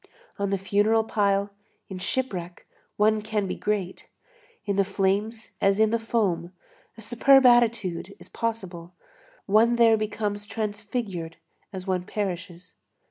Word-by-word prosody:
On 200 0 0
the 195 - 0
funeral 205 +3 +2
pile, 200 -2 0 0.4
in 190 -1 -7
shipwreck, 185 -6 -3 0.3
one 215 +1 +3
can 215 -1 -2
be 190 - -3
great; 200 -3 -3 0.6
in 200 - -1
the 200 - +3
flames 200 +3 -2
as 195 +1 +3
in 220 0 +4
the 230 - +1
foam, 195 -6 -1 0.4
a 225 - -10
superb 265 +4 +5
attitude 220 -7 +3
is 180 - -14
possible; 185 -5 -5 0.5
one 220 +4 +4
there 230 -2 +5
becomes 210 -1 -3
transfigured 205 -6 -4 0.3
as 185 -2 -7
one 185 -2 -1
perishes. 185 -3 -5
205 Hz, 135 wpm, -25 LUFS, 190-220 Hz, 0.6 s, superb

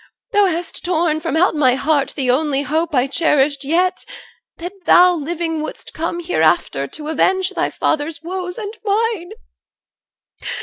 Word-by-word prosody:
Thou 410 -1 +4
hast 345 -1 -4
torn 335 -3 +1
from 320 0 -2
out 360 +3 +3
my 260 -5 +3
heart 285 0 0
The 260 -3 +1
only 280 +1 +1
hope 310 +3 -1
I 250 0 +3
cherished 285 -1 +1
yet, 350 +6 +1 0.5
that 350 +3 -6
thou 360 0 +7
Living 325 0 -3
wouldst 310 - -7
come 335 +2 -3
hereafter 155 - +1
to 300 - -8
avenge 375 +4 +1
Thy - - -1
father's 310 +1 -1
woes 360 +1 -5
and 430 -1 -6
mine. 420 -3 0
325 Hz, 145 wpm, -19 LUFS, 290-360 Hz, 0.5 s, thou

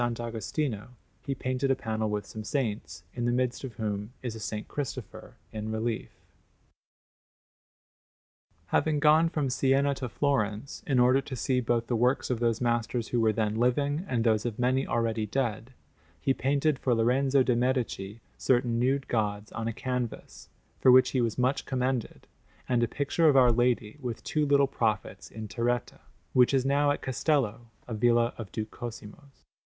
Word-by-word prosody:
Agostino, 120 +1 -3 0.3
he 140 -2 -3
painted 130 +1 -1
a 135 - +4
panel 110 -4 -2
with 105 -1 -2
some 110 +1 -8
saints, 110 - -3
in 120 -1 -3
the 120 - +2
midst 125 +1 -1
of 130 -3 -6
whom 105 -1 -3
is 120 -3 -3
a - - -7 0.2
S. 105 - -5
Cristopher 125 -4 -6 0.2
in 110 0 -5
relief. 110 +1 -2 2.6
Having 155 -2 +2
gone 155 +2 +5
from 150 -5 -1
Siena 135 +2 +2
to 130 -2 -5
Florence 110 -1 -1
in 135 - +2
order 125 +2 +5
to 135 - -7
see 125 +2 0
both 120 -1 0
the 120 - -1
works 125 +3 +1
of 120 - -1
those 115 -2 +1
masters 120 -1 -1
who 120 - +1
were 110 -1 +4
then 105 0 0
living 140 +6 +1
and 120 -3 +1
those 110 -2 +2
of 115 -3 -3
many 130 +2 +1
already 115 -2 0
dead, 120 0 -2 0.5
he 135 - +1
painted 140 +2 +1
for 125 -3 +1
Lorenzo 130 +4 +3
de' 125 -1 +2
Medici 115 -4 -1 0.2
certain 120 -2 +2
nude 135 +2 +1
gods 105 -2 -1
on 110 0 -4
a - - 0
canvas, 125 -1 -5 0.3
for 130 - +6
which 130 0 +6
he 130 - +1
was 115 -2 -1
much 130 +2 +1
commended, 130 -2 -2 0.4
and 125 -2 +2
a 120 - +2
picture 145 +6 +2
of 140 - +4
Our 125 -2 +6
Lady 120 +1 0
with 120 -4 -5
two 150 -1 0
little 140 0 +5
prophets 115 -6 -2
in 110 -1 -7
terretta, 120 +2 -2 0.3
which 125 +1 +5
is 130 -1 +1
now 145 +1 +3
at 145 - -1
Castello, 125 -4 0 0.2
a 120 - -5
villa 120 +2 +2
of 110 -4 -7
Duke 110 -1 -4
Cosimo's. 120 +4 -10
120 Hz, 170 wpm, -28 LUFS, 115-135 Hz, 2.6 s, for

